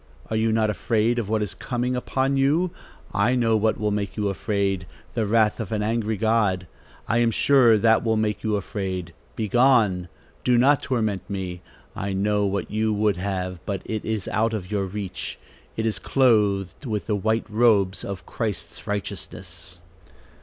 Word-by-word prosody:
Are - - 0
you 110 0 +2
not 110 -1 +2
afraid 115 +2 +1
of 105 -3 -3
what 110 -1 +1
is 105 - -3
coming 125 0 -2
upon 130 +2 0
you? 150 +7 +2 0.4
I 105 +6 +2
know 115 -3 +3
what 110 0 +1
will 105 0 0
make 100 0 -2
you 105 -1 0
afraid, 100 -2 -1 0.3
the 110 -2 0
wrath 110 +1 +3
of 110 -5 -4
an 105 -1 0
angry 110 0 0
God. 105 -4 +1 0.4
I 115 - +2
am 120 -1 +4
sure 120 -1 +5
that 110 +1 +4
will 110 -1 +1
make 105 -1 -1
you 110 -2 +1
afraid. 95 -4 -4 0.2
Begone! 110 -5 +3 0.4
Do 125 -1 +3
not 140 +4 +4
torment 110 -7 -1
me. 95 -3 -4 0.3
I 100 0 -3
know 105 +1 +1
what 100 -1 -2
you 110 +1 +1
would 105 -2 +1
have; 90 -1 -3
but 100 -2 -3
it 110 -1 -3
is 110 -4 -2
out 110 +1 +1
of 95 -2 -6
your 100 -2 0
reach; 95 0 -5 0.4
it 110 - -1
is 110 - 0
clothed 105 - +2
with 105 -3 -2
the 105 - 0
white 110 +3 0
robes 105 -4 +3
of 95 -2 -6
Christ's 110 -6 -4
righteousness." 100 -3 -5
105 Hz, 175 wpm, -24 LUFS, 100-115 Hz, 0.4 s, sure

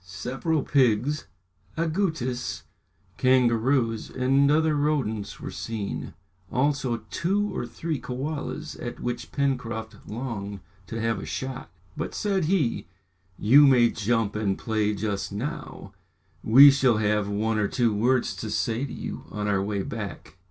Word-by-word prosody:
Several 130 - -2
pigs, 130 +2 +2 0.5
agoutis, 155 - -1 0.5
kangaroos, 120 -2 +2
and 135 +2 +2
other 155 +1 +3
rodents 135 -9 -1
were - - -6
seen, 105 -6 -5 0.4
also 130 -4 0
two 200 +5 0
or 120 - -3
three 160 0 -3
kaolas, 140 +4 -4
at 120 - -5
which 120 0 -4
Pencroft 120 -5 -2
longed 105 -4 -5 0.3
to 115 - -5
have 115 0 0
a - - -6
shot. 130 -3 -5 0.3
"But," - - -4
said 195 -5 0
he, 155 -9 0 0.5
"you 140 +7 +7
may 120 -3 +5
jump 110 -1 0
and 105 -3 0
play 110 -2 0
just 100 -1 -3
now; 115 +9 -6 0.5
we 135 +6 +9
shall 130 -4 +3
have 105 -1 +1
one 110 +2 0
or 105 - +2
two 120 -1 +1
words 120 0 +1
to 110 +4 -5
say 115 +3 -1
to 140 - -4
you - - -6
on 105 0 -3
our 100 -2 +2
way 100 0 -2
back!" 110 - -6
120 Hz, 140 wpm, -26 LUFS, 105-140 Hz, 0.5 s, we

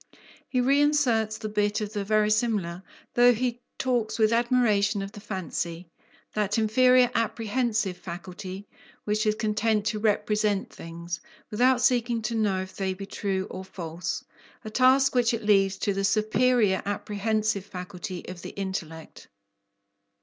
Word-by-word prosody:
He 255 - 0
reinserts 260 -5 +2
the 215 - -5
bit 210 0 0
of 210 -1 -4
the 205 -2 -2
verisimilar, 210 -4 +1 0.3
though 245 0 +6
he 245 +1 -2 0.2
talks 240 -5 0
with 220 0 +3
admiration 220 -4 +2
of 195 - -7
the 205 - -10
fancy, 175 -4 -5 0.4
that 210 +1 0
"inferior 250 +3 +4
apprehensive" 225 -3 0
faculty, 185 +2 -8 0.4
which 215 +1 0
is 215 - +2
content 215 0 0
to 215 0 -1
"represent" 210 -1 0
things, 165 0 -6 0.3
without 245 +3 +3
seeking 240 -2 +2
to 225 +2 -2
know 205 -4 +1
if 190 - -12
they 190 -1 -2
be 195 +1 -7
true 195 -1 -2
or 185 - -6
false, 165 -3 -5 0.4
a 215 - -6
task 265 +3 +4
which 240 -2 +3
it 225 - -6
leaves 195 -2 +3
to 200 - 0
the 195 0 -2
"superior 215 0 +2
apprehensive" 210 0 -1
faculty 180 0 -7
of 180 -1 -8
the - - -9
intellect. 170 -5 -6
210 Hz, 140 wpm, -26 LUFS, 190-230 Hz, 0.4 s, though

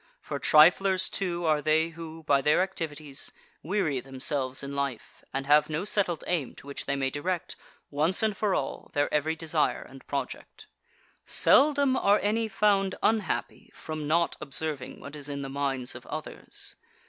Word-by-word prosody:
For - - -5
triflers, 185 +4 +5
too, 175 -3 -2
are 155 -2 +2
they 155 +2 +2
who, 165 0 -9
by 140 -2 +3
their 150 +6 +4
activities, 155 -6 -3 0.3
weary 165 -6 0
themselves 130 0 -1
in 140 0 -5
life, 140 -4 -4
and 135 0 -3
have 150 +2 +5
no 155 +5 -2
settled 195 -6 +1
aim 165 -8 -2
to - - -14
which 140 0 -7
they 140 - 0
may 135 -1 -1
direct, 175 +5 -3 0.4
once 155 +8 +2
and 215 -2 +1
for 200 -1 +1
all, 135 - -4
their 145 0 +1
every 155 +2 +1
desire 160 -1 0
and 135 0 -15
project. 140 -1 -5 0.6
8. - - -19
Seldom 280 -2 +5
are 205 -3 +4
any 220 +2 +1
found 195 -2 +2
unhappy 220 -3 -1
from 155 -2 -5
not 170 +2 +2
observing 150 -2 -3
what 140 +3 -9
is 145 -1 -4
in 140 -1 -4
the 135 - -5
minds 135 -2 -2
of - - -11
others. - - -5
155 Hz, 170 wpm, -28 LUFS, 140-185 Hz, 0.6 s, triflers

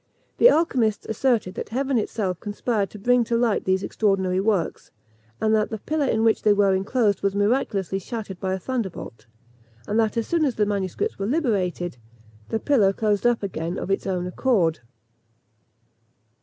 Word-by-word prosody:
The - - +8
alchymists 255 - +1
asserted 220 -4 0
that - - -6
heaven 265 +2 0
itself 195 -4 -2
conspired 210 0 -2
to - - -11
bring 245 +4 +3
to 230 +1 0
light 230 -3 +1
these 190 +1 +1
extraordinary 190 -4 0
works; 195 -4 -1 0.5
and 220 0 +2
that 215 -1 +2
the 220 - -4
pillar 300 +6 -1
in 220 -2 +1
which 225 -1 +3
they 210 - +4
were 200 -1 +3
enclosed 200 +1 +1
was 200 0 0
miraculously 205 -3 0
shattered 200 -2 -6
by 190 -1 -2
a - - -3
thunderbolt; 190 - -5 0.6
and 215 +2 +1
that 220 0 +1
as 230 - 0
soon 335 -2 +1
as 265 -6 +1
the 210 - +2
manuscripts 205 - -2
were 195 - -1
liberated, 195 - -1 0.5
the 225 - -1
pillar 215 -9 +3
closed 210 +2 +1
up 240 -3 +1
again 170 -2 -3
of 195 - -4
its 195 - -1
own 180 -2 -1
accord! 180 -4 +1
210 Hz, 170 wpm, -24 LUFS, 190-235 Hz, 0.6 s, The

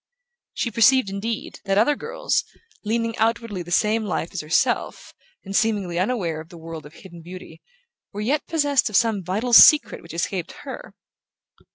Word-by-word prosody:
She 235 - -2
perceived, 235 0 +4
indeed, 215 +3 -5
that 195 0 0
other 240 +8 +3
girls, - - -2 0.4
leading 230 +1 -1
outwardly 225 -3 -1
the 175 - -9
same 215 +5 +1
life 180 -4 -3
as 185 - -3
herself, 155 +2 -1 0.3
and 195 +1 -6
seemingly 200 -6 0
unaware 180 -7 -1
of 160 - -15
her 170 - -12
world 160 -2 -9
of 150 - -18
hidden 175 -3 -13
beauty, 180 +2 -11 0.5
were 205 - -6
yet 280 +8 -1
possessed 290 -6 +1
of 215 - -6
some 220 -3 +2
vital 210 +8 -2
secret 300 +5 +7
which 165 0 -11
escaped 175 0 -3
her. - - -9
205 Hz, 165 wpm, -22 LUFS, 175-230 Hz, 0.5 s, secret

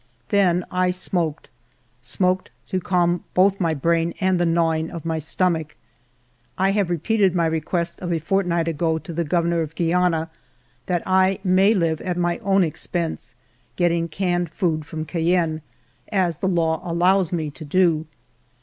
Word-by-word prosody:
Then 180 -3 +3
I 180 0 +1
smoked, 175 -4 -2 0.3
— 115 - -41
smoked 185 +9 0 0.2
to 185 - 0
calm 175 -1 +1
both 195 +2 +4
my 165 -4 +1
brain 165 +3 0
and 185 -2 +2
the 175 - +2
gnawing 165 -1 +1
of 165 -1 -8
my 160 -1 -1
stomach. 160 -1 -1 0.8
I 190 +1 +2
have 200 -3 0
repeated 190 +2 +1
my 170 -1 +2
request 165 +2 -1
of 175 -1 -4
a 170 - +1
fortnight 170 0 0
ago 160 0 0
to 170 +1 -8
the 170 +1 -1
Governor 170 +1 +1
of 160 0 -5
Guiana, 165 -1 +1 0.6
that 175 -2 0
I 190 +1 +3
may 190 +3 +4
live 165 -4 0
at 180 -1 -3
my 175 -1 0
own 195 -1 +2
expense, 170 0 -3 0.4
getting 170 -1 +1
canned 175 0 -1
food 160 -3 -1
from 155 -1 -5
Cayenne, 165 -1 0 0.5
as 180 -6 +1
the 190 - -1
law 165 -3 +1
allows 180 +1 +2
me 160 -4 -2
to 155 - -10
do. 160 0 +2
170 Hz, 160 wpm, -22 LUFS, 160-185 Hz, 0.8 s, both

